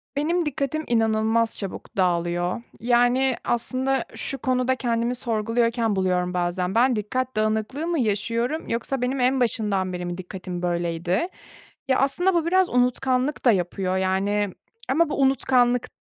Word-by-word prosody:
Benim 330 Hz, +4 st, 0 dB
dikkatim 300 Hz, +1 st, -2 dB
inanılmaz 225 Hz, 0 st, +1 dB
çabuk 195 Hz, 0 st, -7 dB
dağılıyor. 175 Hz, +2 st, 0 dB, 0.2 s
Yani, 245 Hz, +2 st, +3 dB
aslında 260 Hz, +2 st, 0 dB
şu 275 Hz, -, -4 dB
konuda 255 Hz, 0 st, +1 dB
kendimi 235 Hz, -1 st, -1 dB
sorguluyorken 230 Hz, -1 st, 0 dB
buluyorum 180 Hz, -1 st, 0 dB
bazen. 180 Hz, +1 st, -1 dB
Ben 245 Hz, +2 st, +4 dB
dikkat 255 Hz, +5 st, -2 dB
dağınıklığı 220 Hz, +8 st, -1 dB
mı 340 Hz, -2 st, 0 dB
yaşıyorum 230 Hz, +6 st, -1 dB
yoksa 240 Hz, +3 st, -2 dB
benim 255 Hz, +2 st, -1 dB
en 255 Hz, +2 st, +2 dB
başından 210 Hz, -6 st, 0 dB
beri 180 Hz, 0 st, -4 dB
mi 175 Hz, 0 st, -4 dB
dikkatim 180 Hz, -1 st, -6 dB
böyleydi? 175 Hz, -, -1 dB, 0.6 s
Ya, 260 Hz, -1 st, +2 dB
aslında 350 Hz, +8 st, +2 dB
bu 340 Hz, -2 st, +1 dB
biraz 370 Hz, +1 st, +3 dB
unutkanlık 255 Hz, +3 st, +1 dB
da 245 Hz, -, +7 dB
yapıyor, 185 Hz, -1 st, -1 dB
yani, 195 Hz, +1 st, 0 dB, 0.4 s
ama 315 Hz, +4 st, +3 dB
bu 285 Hz, -, -1 dB
unutkanlık 250 Hz, -2 st, +3 dB
235 Hz, 140 wpm, -24 LUFS, 190-260 Hz, 0.6 s, da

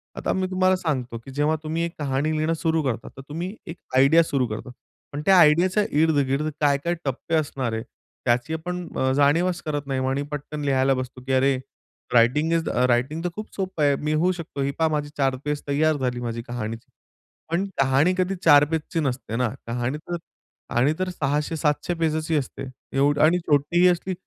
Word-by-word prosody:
आता -, -, -1 dB
मी 185 Hz, 0 st, 0 dB
तुम्हाला 185 Hz, 0 st, +3 dB
सांगतो 130 Hz, -10 st, -2 dB
की 135 Hz, -, -9 dB
जेव्हा 150 Hz, +3 st, +1 dB
तुम्ही 160 Hz, +2 st, -2 dB
एक 170 Hz, -, -4 dB
कहाणी 140 Hz, +2 st, 0 dB
लिहिणं 155 Hz, +2 st, +1 dB
सुरू 160 Hz, -1 st, 0 dB
करता, 120 Hz, -4 st, -2 dB
तर -, -, -7 dB
तुम्ही 175 Hz, +7 st, -4 dB
एक 165 Hz, -, -7 dB, 0.2 s
आयडिया 145 Hz, +6 st, +6 dB
सुरू 135 Hz, -6 st, 0 dB
करतात. 110 Hz, +3 st, -6 dB, 0.4 s
पण 145 Hz, -, -3 dB
त्या 190 Hz, -1 st, +6 dB
आयडियाच्या 175 Hz, +6 st, +5 dB, 0.2 s
इर्द-गिर्द 145 Hz, -2 st, +2 dB
काय-काय 145 Hz, +4 st, +2 dB
टप्पे 135 Hz, +5 st, -2 dB
असणार 135 Hz, -6 st, -1 dB
आहे, 110 Hz, 0 st, -3 dB, 0.4 s
त्याची 120 Hz, +5 st, +1 dB
आपण 180 Hz, +2 st, -4 dB
अ, 130 Hz, 0 st, +2 dB
जाणीवच 165 Hz, +5 st, +2 dB
करत 145 Hz, -2 st, -3 dB
नाही 135 Hz, -1 st, -1 dB
आणि 135 Hz, +2 st, 0 dB
पटकन 150 Hz, +1 st, -5 dB
लिहायला 135 Hz, -1 st, +3 dB
बसतो 130 Hz, 0 st, -5 dB
की 135 Hz, -, 0 dB
अरे 135 Hz, 0 st, +3 dB, 0.6 s
रायटिंग 125 Hz, +7 st, +4 dB
इज 165 Hz, -1 st, +2 dB
द -, -, -3 dB, 0.2 s
रायटिंग 130 Hz, +7 st, +1 dB
तर 180 Hz, -, 0 dB
खूप 215 Hz, 0 st, -8 dB
सोपं 185 Hz, -5 st, -2 dB
आहे. 140 Hz, -1 st, +4 dB
मी 150 Hz, +2 st, -2 dB
होऊ 170 Hz, +4 st, +2 dB
शकतो. 165 Hz, -5 st, -6 dB
ही 140 Hz, +1 st, 0 dB
पहा 160 Hz, -, +4 dB
माझी 150 Hz, -1 st, -2 dB
4 135 Hz, -2 st, +2 dB
पेज 150 Hz, 0 st, -1 dB
तैयार 155 Hz, +2 st, +2 dB
झाली 125 Hz, -2 st, -2 dB
माझी 115 Hz, -1 st, -3 dB
कहाणीची. 115 Hz, -1 st, -5 dB, 0.6 s
पण 175 Hz, +4 st, +1 dB, 0.2 s
कहाणी 135 Hz, +7 st, +3 dB
कधी 185 Hz, +1 st, 0 dB
4 145 Hz, 0 st, +7 dB
पेजच 160 Hz, +1 st, -3 dB
नसते 125 Hz, -4 st, -3 dB
ना, 125 Hz, -1 st, +1 dB, 0.2 s
कहाणी 120 Hz, +4 st, -2 dB
तर, 175 Hz, +3 st, -6 dB, 0.5 s
कहाणी 130 Hz, +6 st, +2 dB
तर 185 Hz, 0 st, -1 dB
600-700 150 Hz, +1 st, -1 dB
पेजच 160 Hz, -1 st, -1 dB
असते, 135 Hz, -, -6 dB, 0.3 s
एवढी 145 Hz, +1 st, +3 dB
आणि 165 Hz, +3 st, +5 dB
छोटीही 155 Hz, +5 st, +3 dB
असली 180 Hz, +1 st, +1 dB
150 Hz, 190 wpm, -24 LUFS, 135-165 Hz, 0.6 s, 4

